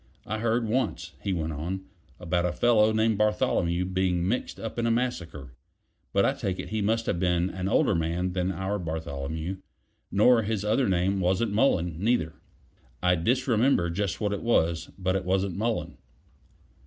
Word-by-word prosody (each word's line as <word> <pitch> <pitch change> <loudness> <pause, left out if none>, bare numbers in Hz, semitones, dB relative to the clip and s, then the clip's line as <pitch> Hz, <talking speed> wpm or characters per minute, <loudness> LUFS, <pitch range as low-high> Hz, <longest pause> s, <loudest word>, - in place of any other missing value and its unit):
"I 110 +1 -3
heard 115 +1 +1
once," 105 -8 -1
he 100 - -2
went 80 -3 -2
on, 85 +6 -4 0.4
"about 90 0 0
a - - -1
fellow 110 +1 +4
named 110 -1 +1
Bartholomew 90 -4 +1
being 90 -1 0
mixed 120 +6 -2
up 115 +1 -5
in 115 - +1
a - - +2
massacre. 90 - -2 0.6
But 100 - +3
I - - +2
take 100 -9 -3
it - - -6
he 110 0 -1
must 115 +3 +1
have 85 - -1
been 90 0 +1
an 95 0 -3
older 105 - +3
man 85 +2 -1
than 90 0 0
our 95 +3 -2
Bartholomew 80 +1 -4 0.5
nor 115 +4 +5
his 105 -1 -2
other 110 +3 +2
name 95 +2 +1
wasn't 95 +4 +1
Mullen, 90 - +2
neither. 105 -9 +1 0.7
I 90 0 +4
disremember 115 -1 +2
just 95 +1 -2
what 105 -1 0
it 100 - -3
was; 85 -8 +1
but 95 0 0
it 95 - -1
wasn't 95 0 0
Mullen." 115 +2 -2
95 Hz, 170 wpm, -27 LUFS, 85-110 Hz, 0.7 s, nor